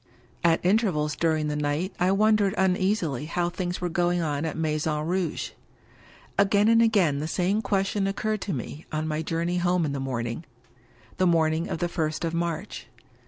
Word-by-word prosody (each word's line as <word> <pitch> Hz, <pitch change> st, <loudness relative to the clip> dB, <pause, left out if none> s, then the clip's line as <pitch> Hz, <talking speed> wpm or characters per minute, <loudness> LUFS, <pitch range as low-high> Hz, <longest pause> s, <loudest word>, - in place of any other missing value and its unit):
At 170 Hz, 0 st, +3 dB
intervals 180 Hz, -8 st, +2 dB
during 155 Hz, 0 st, +1 dB
the 150 Hz, -, -2 dB
night 150 Hz, +5 st, -1 dB
I 180 Hz, +1 st, +3 dB
wondered 210 Hz, -1 st, +3 dB
uneasily 185 Hz, -, +1 dB
how 175 Hz, +2 st, -1 dB
things 180 Hz, -1 st, -3 dB
were 180 Hz, -, -1 dB
going 175 Hz, +1 st, +1 dB
on 150 Hz, -2 st, -1 dB
at 160 Hz, -, -3 dB
Maison 155 Hz, -1 st, -1 dB
Rouge. 175 Hz, -1 st, -2 dB, 0.9 s
Again 200 Hz, +1 st, +4 dB
and 230 Hz, 0 st, +5 dB
again 195 Hz, -11 st, +3 dB
the 155 Hz, -, -3 dB
same 185 Hz, +5 st, 0 dB
question 195 Hz, -1 st, 0 dB
occurred 215 Hz, +1 st, -2 dB
to 200 Hz, -, -3 dB
me, 145 Hz, +4 st, -6 dB
on 155 Hz, 0 st, -2 dB
my 155 Hz, 0 st, -1 dB
journey 165 Hz, +2 st, -1 dB
home 175 Hz, -1 st, +2 dB
in 145 Hz, -, -2 dB
the 140 Hz, -, -3 dB
early 135 Hz, -, -3 dB
morning 120 Hz, +3 st, -3 dB, 0.4 s
— 115 Hz, -1 st, -28 dB
^the 185 Hz, -, +4 dB
morning 160 Hz, 0 st, +2 dB
of -, -, -2 dB
the 175 Hz, -, -1 dB
first 160 Hz, -1 st, -2 dB
of 165 Hz, -, -2 dB
March. 170 Hz, +2 st, -3 dB
170 Hz, 185 wpm, -26 LUFS, 155-190 Hz, 0.9 s, and